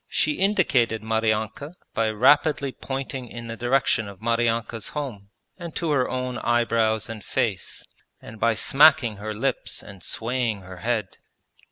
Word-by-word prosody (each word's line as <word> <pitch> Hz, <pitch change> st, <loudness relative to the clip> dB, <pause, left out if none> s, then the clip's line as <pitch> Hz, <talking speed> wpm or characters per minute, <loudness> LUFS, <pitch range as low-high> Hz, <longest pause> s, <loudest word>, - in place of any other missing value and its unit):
She -, -, +1 dB
indicated 150 Hz, -, +2 dB
Maryanka 110 Hz, -, -1 dB, 0.2 s
by 115 Hz, -1 st, +1 dB
rapidly 140 Hz, +5 st, +3 dB
pointing 135 Hz, -1 st, -5 dB
in 120 Hz, 0 st, -8 dB
the 115 Hz, 0 st, -5 dB
direction 120 Hz, -3 st, +1 dB
of 100 Hz, -2 st, -10 dB
Maryanka's 115 Hz, -1 st, 0 dB
home 110 Hz, -9 st, -5 dB, 0.3 s
and 170 Hz, -2 st, -7 dB
to 165 Hz, -3 st, -1 dB
her 130 Hz, -3 st, +2 dB
own 125 Hz, -1 st, -3 dB
eyebrows 115 Hz, -2 st, +1 dB
and 110 Hz, -3 st, -7 dB
face, 115 Hz, -8 st, -2 dB, 0.3 s
and 110 Hz, -, -11 dB
by 115 Hz, 0 st, +3 dB
smacking 140 Hz, -4 st, +5 dB
her 110 Hz, +2 st, -5 dB
lips 135 Hz, +5 st, -2 dB
and 100 Hz, -2 st, -12 dB
swaying 115 Hz, 0 st, -2 dB
her 95 Hz, 0 st, -10 dB
head. 110 Hz, -1 st, -2 dB
115 Hz, 145 wpm, -24 LUFS, 110-135 Hz, 0.3 s, smacking